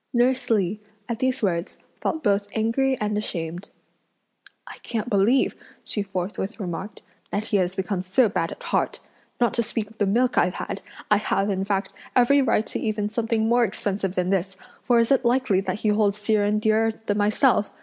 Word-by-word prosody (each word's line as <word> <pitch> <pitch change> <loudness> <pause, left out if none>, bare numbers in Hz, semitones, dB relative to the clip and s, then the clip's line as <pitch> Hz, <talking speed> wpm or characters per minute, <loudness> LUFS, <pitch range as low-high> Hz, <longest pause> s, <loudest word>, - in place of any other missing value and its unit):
Nurse 250 +1 +2
Li, 210 -2 +1 0.3
at 235 -1 -3
these 260 -1 0
words, 170 -3 -1 0.2
felt 320 -1 -2
both 200 -2 +2
angry 255 +4 +1
and 210 0 -1
ashamed. 175 -1 -5 1.0
"I - - -10
can't 230 +1 -4
believe," 215 +6 +3 0.3
she 210 - -2
forthwith 195 +2 -4
remarked, 190 +2 -5 0.3
"that 205 - -1
he 215 -1 0
has 185 -1 0
become 190 -1 -2
so 190 +7 +3
bad 165 -4 -1
at - - -9
heart! - - -1 0.4
Not 240 -1 +2
to 235 - +1
speak 215 -1 -3
of 225 - -21
the 205 - +2
milk 245 +5 +2
I've 180 +1 +1
had, - - -5 0.3
I 210 - +7
have, 200 -1 0
in 190 0 -1
fact 195 -1 -1 0.2
every 265 +3 +5
right 225 -4 +2
to - - -3
even 215 -1 -1
something 225 0 0
more 240 +1 +4
expensive 195 -2 -2
than 180 0 0
this; 190 0 -1 0.2
for 240 -2 +3
is 230 +1 +3
it 270 -1 +4
likely 240 -5 +2
that 190 +1 -3
he 215 - +2
holds 210 -1 +2
Hsi 210 +1 -1
Jen 210 0 +2
dearer 220 +1 +2
than 205 -1 0
myself? 210 +2 +3
210 Hz, 190 wpm, -24 LUFS, 195-235 Hz, 1.0 s, I